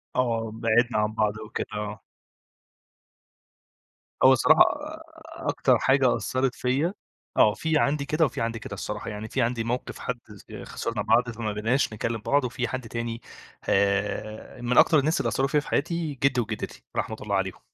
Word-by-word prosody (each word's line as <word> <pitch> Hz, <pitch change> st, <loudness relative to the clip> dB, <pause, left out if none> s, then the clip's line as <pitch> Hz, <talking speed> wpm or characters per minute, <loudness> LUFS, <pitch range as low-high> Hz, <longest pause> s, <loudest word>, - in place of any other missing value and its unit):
آه، 115 Hz, -3 st, 0 dB
بِعدْنا 115 Hz, +1 st, +2 dB
عن 105 Hz, 0 st, +1 dB
بعض 105 Hz, -1 st, 0 dB
أو 110 Hz, 0 st, -9 dB
كده، -, -, -3 dB
آه. 105 Hz, 0 st, -4 dB, 2.2 s
هو 130 Hz, 0 st, +9 dB
الصراحة 155 Hz, +5 st, +5 dB
آآ، 305 Hz, +2 st, +1 dB, 0.5 s
أكتر 130 Hz, -2 st, +3 dB
حاجة 135 Hz, -1 st, +3 dB
أثّرت 130 Hz, +3 st, -1 dB
فيا 140 Hz, +8 st, 0 dB, 0.4 s
آه، 105 Hz, -, +6 dB
في 160 Hz, +6 st, 0 dB
عندي 140 Hz, -1 st, +1 dB
كده 155 Hz, +3 st, +2 dB
وفي 135 Hz, -, -3 dB
عندي 115 Hz, 0 st, -2 dB
كده 105 Hz, -, -8 dB
الصراحة، 105 Hz, +1 st, -5 dB
يعني 105 Hz, +1 st, -6 dB
في 130 Hz, -, -1 dB
عندي 115 Hz, -1 st, 0 dB
موقف 120 Hz, +2 st, -3 dB
حد 125 Hz, -1 st, -3 dB, 0.2 s
س 95 Hz, -, -16 dB
آآ، -, -, -8 dB
خسرنا 115 Hz, -3 st, -3 dB
بعض 120 Hz, +3 st, +3 dB
فما 110 Hz, -2 st, -3 dB
بقيناش 110 Hz, +4 st, 0 dB
نكلم 115 Hz, +1 st, -3 dB
بعض 140 Hz, +6 st, +2 dB
وفي 125 Hz, 0 st, -2 dB
حد 130 Hz, -3 st, -5 dB
تاني 115 Hz, 0 st, -4 dB, 0.5 s
آآ، 100 Hz, +4 st, 0 dB
من 120 Hz, +1 st, 0 dB
أكتر 155 Hz, -, +7 dB
الناس 155 Hz, +4 st, +1 dB
اللي -, -, 0 dB
أثّروا 135 Hz, -, +1 dB
فيا 150 Hz, +2 st, +2 dB
في 145 Hz, -, -8 dB
حياتي 165 Hz, 0 st, -1 dB
جدّي 135 Hz, -3 st, +3 dB
وجدّتي، 110 Hz, -2 st, -6 dB
رحمة 110 Hz, -, -2 dB
الله 100 Hz, -1 st, -1 dB
عليهم. 95 Hz, -2 st, -2 dB
120 Hz, 175 wpm, -26 LUFS, 110-135 Hz, 2.2 s, هو